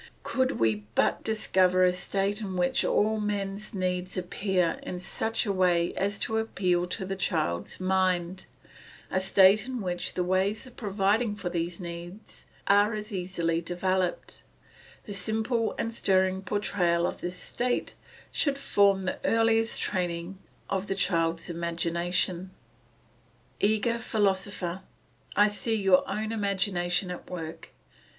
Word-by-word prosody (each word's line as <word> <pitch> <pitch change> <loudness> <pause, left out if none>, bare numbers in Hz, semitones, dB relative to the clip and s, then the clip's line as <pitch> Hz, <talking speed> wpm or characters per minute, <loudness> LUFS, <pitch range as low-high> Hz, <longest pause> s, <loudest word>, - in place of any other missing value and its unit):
Could 260 0 +1
we 110 -2 0
but - - +2
discover 185 -4 +3
a 180 0 +4
state 195 +3 -1
in 190 -3 -4
which 175 0 +2
all 215 +1 +2
man's 205 0 -3
needs 185 0 -2
appear 180 -1 0
in 180 - -5
such 225 +5 -2
a 200 - 0
way 175 -2 +2
as 200 +2 -1
to 220 -1 0
appeal 180 -5 0
to 190 +2 -4
the 195 +1 -3
child's 155 - -1
mind, 185 -1 0 0.7
a 185 - +1
state 195 +3 +5
in 255 -1 -3
which 180 -3 -3
the 180 - +1
ways 190 +5 +1
of 255 - -13
providing 205 +1 +1
for 195 -3 -4
these 170 0 -3
needs 175 +3 -8 0.2
are 205 +2 +4
as 210 0 -6
easily 175 -3 -1
developed, 180 +1 -2 0.6
the 205 - -7
simple 220 +4 0
and 230 - -2
stirring 190 -3 +2
portrayal 180 -3 +1
of - - -3
this 180 +1 -4
state 245 +6 -2 0.4
should 285 -2 +1
form 200 -7 +3
the 185 - -2
earliest 225 0 +2
training 180 0 -2 0.3
of 195 +1 -2
the 195 - -1
child's 165 -3 0
imagination. 170 +2 -1 1.1
Eager 220 +3 +2
philosopher, 195 -4 -1 0.5
I 205 +1 +6
see 225 +2 -1
your 195 -3 +3
own 215 +1 -2
imagination 190 -3 0
at 180 - -8
work. 165 -3 -7
190 Hz, 135 wpm, -28 LUFS, 180-210 Hz, 1.1 s, I